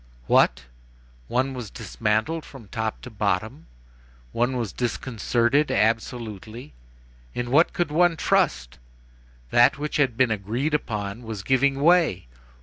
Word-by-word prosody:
What! 65 Hz, +2 st, +3 dB, 0.6 s
one 130 Hz, -, 0 dB
was 125 Hz, -5 st, -6 dB
dismantled 110 Hz, +14 st, -2 dB
from 120 Hz, -8 st, -13 dB
top 110 Hz, -1 st, -3 dB
to 125 Hz, -, -9 dB
bottom! 105 Hz, -, -2 dB, 0.6 s
one 125 Hz, +2 st, 0 dB
was 115 Hz, -6 st, -3 dB
disconcerted, 120 Hz, +3 st, 0 dB
absolutely! 110 Hz, -, -2 dB, 0.6 s
In 120 Hz, 0 st, -3 dB
what 155 Hz, +6 st, +5 dB
could 175 Hz, -4 st, -2 dB
one 170 Hz, +1 st, +3 dB
trust! -, -, 0 dB, 0.7 s
That 120 Hz, +3 st, +5 dB
which 150 Hz, +1 st, -3 dB
had 130 Hz, -6 st, +1 dB
been 130 Hz, -3 st, +3 dB
agreed 110 Hz, +9 st, -2 dB
upon 105 Hz, -6 st, -3 dB
was 110 Hz, -4 st, -6 dB
giving 135 Hz, +3 st, +2 dB
way! 165 Hz, -, +3 dB
120 Hz, 125 wpm, -24 LUFS, 110-140 Hz, 0.7 s, what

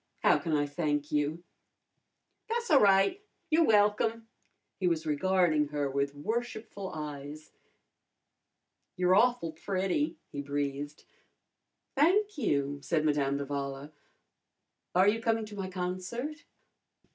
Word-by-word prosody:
How -, -, +5 dB
can 165 Hz, -3 st, -3 dB
I 145 Hz, -1 st, +2 dB
thank 145 Hz, 0 st, -2 dB
you?" 150 Hz, +3 st, 0 dB, 1.1 s
"Tha's 470 Hz, -3 st, -2 dB
a'right. 200 Hz, -, +5 dB, 0.3 s
You're 325 Hz, +1 st, +5 dB
welcome." 220 Hz, +1 st, +2 dB, 0.5 s
He 185 Hz, -, +1 dB
was 165 Hz, -2 st, 0 dB
regarding 155 Hz, -1 st, +2 dB
her 145 Hz, -1 st, -2 dB
with 140 Hz, +1 st, -1 dB
worshipful 220 Hz, +2 st, -4 dB
eyes. 150 Hz, 0 st, -7 dB, 1.5 s
"You're 180 Hz, 0 st, +3 dB
awful 235 Hz, -5 st, +3 dB
pretty," 195 Hz, -, -1 dB
he 140 Hz, -, -4 dB
breathed. 145 Hz, +1 st, -3 dB, 0.9 s
"Thank 400 Hz, +9 st, +3 dB
you," 145 Hz, -, 0 dB
said 155 Hz, +1 st, 0 dB
Madame 140 Hz, -2 st, +1 dB
d'Avala. 140 Hz, 0 st, -4 dB, 1.0 s
"Are 185 Hz, +2 st, +5 dB
you 225 Hz, +2 st, +2 dB
coming 225 Hz, -1 st, +1 dB
to 210 Hz, -1 st, -10 dB
my 190 Hz, -2 st, -4 dB
concert?" 185 Hz, -, -4 dB
180 Hz, 110 wpm, -30 LUFS, 145-220 Hz, 1.5 s, How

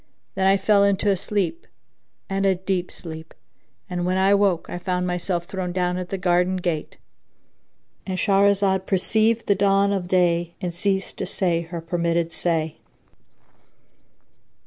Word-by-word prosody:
Then 190 Hz, 0 st, +1 dB
I 195 Hz, +1 st, +5 dB
fell 200 Hz, +1 st, +3 dB
into 200 Hz, +1 st, +2 dB
a -, -, +2 dB
sleep 200 Hz, -, -2 dB, 0.6 s
and 195 Hz, 0 st, -1 dB
a 195 Hz, -1 st, +3 dB
deep 185 Hz, -1 st, -2 dB
sleep; 160 Hz, -1 st, -9 dB, 0.5 s
and 175 Hz, -1 st, -3 dB
when 185 Hz, +1 st, 0 dB
I 190 Hz, +1 st, +3 dB
awoke, 200 Hz, -4 st, +2 dB
I 175 Hz, -, -5 dB
found 180 Hz, 0 st, -1 dB
myself 180 Hz, -1 st, -2 dB
thrown 185 Hz, -1 st, -4 dB
down 180 Hz, 0 st, -1 dB
at 180 Hz, 0 st, -6 dB
the 195 Hz, -, -2 dB
garden 180 Hz, 0 st, +2 dB
gate,—And 175 Hz, +2 st, -8 dB
Shahrazad 195 Hz, -1 st, +2 dB
perceived 220 Hz, +4 st, +2 dB
the 200 Hz, -, +4 dB
dawn 200 Hz, 0 st, +2 dB
of 185 Hz, -3 st, -2 dB
day 175 Hz, -2 st, +1 dB
and 180 Hz, -3 st, -3 dB
ceased 190 Hz, +2 st, -1 dB
to -, -, -3 dB
say 170 Hz, -3 st, 0 dB
her 170 Hz, 0 st, -6 dB
permitted 170 Hz, 0 st, -1 dB
say. 160 Hz, -1 st, -1 dB
185 Hz, 145 wpm, -23 LUFS, 175-195 Hz, 0.6 s, I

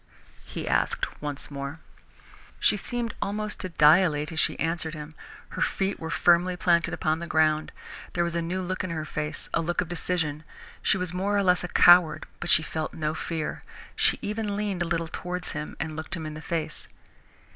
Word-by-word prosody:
he -, -, -6 dB
asked -, -, 0 dB
once 145 Hz, -1 st, -4 dB
more. 140 Hz, +2 st, -5 dB, 0.8 s
She -, -, +4 dB
seemed 235 Hz, +2 st, -3 dB
almost 210 Hz, +1 st, -2 dB
to 185 Hz, -, -4 dB
dilate 155 Hz, -1 st, +4 dB
as 160 Hz, -, -2 dB
she -, -, +2 dB
answered 165 Hz, -1 st, -1 dB
him. 150 Hz, 0 st, -8 dB, 0.4 s
Her -, -, -6 dB
feet 195 Hz, 0 st, 0 dB
were 160 Hz, -, -5 dB
firmly 175 Hz, +2 st, +3 dB
planted 170 Hz, -3 st, +3 dB
upon 155 Hz, +1 st, 0 dB
the 170 Hz, -, -5 dB
ground. 155 Hz, -1 st, +2 dB, 0.4 s
There 175 Hz, -, +2 dB
was 170 Hz, 0 st, -2 dB
a 170 Hz, -, +1 dB
new 180 Hz, +3 st, -2 dB
look 185 Hz, +1 st, -2 dB
in 185 Hz, -, -3 dB
her 160 Hz, -2 st, -3 dB
face, 150 Hz, -1 st, -4 dB
a -, -, +2 dB
look 175 Hz, +1 st, -1 dB
of 180 Hz, -, 0 dB
decision. 165 Hz, -4 st, -1 dB, 0.4 s
She -, -, +3 dB
was 180 Hz, -2 st, -3 dB
more 200 Hz, +3 st, 0 dB
or 200 Hz, -, +3 dB
less 180 Hz, -1 st, +3 dB
a -, -, -2 dB
coward 175 Hz, -3 st, +6 dB
but 175 Hz, -, -4 dB
she 160 Hz, -, +6 dB
felt 160 Hz, 0 st, -4 dB
no 155 Hz, -1 st, -1 dB
fear. 160 Hz, -1 st, -3 dB, 0.3 s
She -, -, +3 dB
even 210 Hz, -1 st, -2 dB
leaned 205 Hz, -3 st, -2 dB
a -, -, +2 dB
little 165 Hz, -1 st, -1 dB
towards 180 Hz, +2 st, -4 dB
him 150 Hz, -, -5 dB
and 160 Hz, -1 st, -3 dB
looked 160 Hz, +2 st, -4 dB
him 160 Hz, -2 st, -5 dB
in 155 Hz, -, -5 dB
the 155 Hz, -, -7 dB
face. 165 Hz, -1 st, -3 dB
170 Hz, 200 wpm, -27 LUFS, 155-180 Hz, 0.8 s, coward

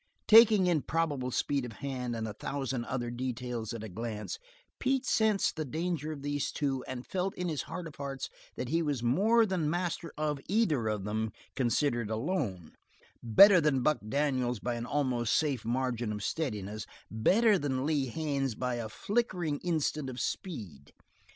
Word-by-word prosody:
Taking 220 Hz, -3 st, +8 dB
in 170 Hz, -4 st, +2 dB
probable 145 Hz, -6 st, -1 dB
speed 140 Hz, +2 st, 0 dB
of 120 Hz, -2 st, -6 dB
hand 125 Hz, -2 st, -4 dB
and 110 Hz, -1 st, -3 dB
a 105 Hz, -, -5 dB
thousand 135 Hz, -2 st, -3 dB
other 120 Hz, -2 st, -3 dB
details 120 Hz, -2 st, -3 dB
at 115 Hz, -2 st, -5 dB
a -, -, -5 dB
glance, 110 Hz, -, -5 dB, 0.4 s
Pete 265 Hz, 0 st, +1 dB
sensed 220 Hz, -4 st, +2 dB
the 155 Hz, -, -1 dB
danger 155 Hz, +1 st, -2 dB
of 140 Hz, -3 st, -7 dB
these 145 Hz, -1 st, -1 dB
two 135 Hz, -3 st, -1 dB
and 130 Hz, -1 st, -5 dB
felt 190 Hz, +1 st, -2 dB
in 180 Hz, -1 st, -2 dB
his 155 Hz, -3 st, -1 dB
heart 180 Hz, -2 st, -5 dB
of 155 Hz, -, -10 dB
hearts 140 Hz, -1 st, -4 dB, 0.3 s
that 125 Hz, -, -4 dB
he 165 Hz, +2 st, +2 dB
was 145 Hz, -6 st, -1 dB
more 215 Hz, -, +4 dB
than 180 Hz, -7 st, 0 dB
master 170 Hz, -1 st, -2 dB
of 150 Hz, -2 st, -1 dB
either 175 Hz, -, +2 dB
of 105 Hz, -2 st, -1 dB
them, 110 Hz, +2 st, -2 dB, 0.2 s
considered 120 Hz, -2 st, +1 dB
alone; 110 Hz, -, -2 dB, 0.5 s
better 180 Hz, -, +8 dB
than 140 Hz, -4 st, +2 dB
Buck 155 Hz, +2 st, +3 dB
Daniels 130 Hz, -3 st, +1 dB
by 120 Hz, +3 st, -2 dB
an 120 Hz, 0 st, -4 dB
almost 125 Hz, -5 st, +1 dB
safe 140 Hz, -8 st, +1 dB
margin 120 Hz, -2 st, -1 dB
of 105 Hz, -1 st, -4 dB
steadiness; 105 Hz, -9 st, -3 dB, 0.2 s
better 200 Hz, -, +4 dB
than 130 Hz, -2 st, -1 dB
Lee 145 Hz, -3 st, +1 dB
Haines 140 Hz, -2 st, -1 dB
by 125 Hz, 0 st, -2 dB
a 115 Hz, -2 st, -4 dB
flickering 180 Hz, -, -1 dB
instant 155 Hz, -4 st, -1 dB
of 130 Hz, 0 st, -6 dB
speed. 105 Hz, -, -5 dB
135 Hz, 170 wpm, -31 LUFS, 120-165 Hz, 0.5 s, Taking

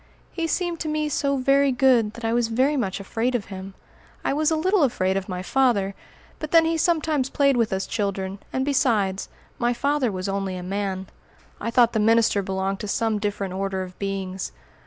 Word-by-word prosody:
He 335 Hz, -2 st, -2 dB
seemed 345 Hz, 0 st, -1 dB
to 315 Hz, -, -3 dB
me 305 Hz, 0 st, -1 dB
so 280 Hz, -1 st, 0 dB
very 275 Hz, +1 st, +3 dB
good 245 Hz, -4 st, +3 dB
that 235 Hz, 0 st, -7 dB
I 225 Hz, -, +1 dB
was 240 Hz, -1 st, +2 dB
very 260 Hz, +6 st, +2 dB
much 200 Hz, -8 st, -1 dB
afraid 230 Hz, +5 st, -1 dB
of 215 Hz, -5 st, -1 dB
him. 190 Hz, +1 st, -8 dB, 0.5 s
I -, -, +1 dB
was 305 Hz, +1 st, +2 dB
a 320 Hz, -, +2 dB
little 370 Hz, +4 st, +2 dB
afraid 190 Hz, -9 st, +1 dB
of 195 Hz, 0 st, -3 dB
my 180 Hz, 0 st, -4 dB
father, 215 Hz, -5 st, +2 dB, 0.5 s
but 310 Hz, -, -5 dB
then 330 Hz, 0 st, +6 dB
he 330 Hz, 0 st, +1 dB
sometimes 315 Hz, -5 st, +1 dB
played 280 Hz, -1 st, +3 dB
with 230 Hz, -2 st, +1 dB
us 190 Hz, 0 st, -1 dB
children: 200 Hz, -2 st, -3 dB
and 260 Hz, 0 st, -1 dB
besides, 215 Hz, -9 st, +1 dB, 0.3 s
my 240 Hz, 0 st, +1 dB
father 280 Hz, -1 st, +1 dB
was 185 Hz, 0 st, -4 dB
only 195 Hz, -1 st, -2 dB
a 180 Hz, -, -6 dB
man. 190 Hz, 0 st, -3 dB, 0.5 s
I 230 Hz, -, -3 dB
thought 240 Hz, -1 st, +4 dB
the 220 Hz, -, +1 dB
minister 220 Hz, -1 st, +3 dB
belonged 190 Hz, 0 st, -2 dB
to 210 Hz, -, -5 dB
some 220 Hz, +1 st, 0 dB
different 200 Hz, -2 st, -3 dB
order 190 Hz, 0 st, -2 dB
of 180 Hz, -1 st, -11 dB
beings. 195 Hz, -1 st, -3 dB
225 Hz, 200 wpm, -24 LUFS, 195-275 Hz, 0.5 s, then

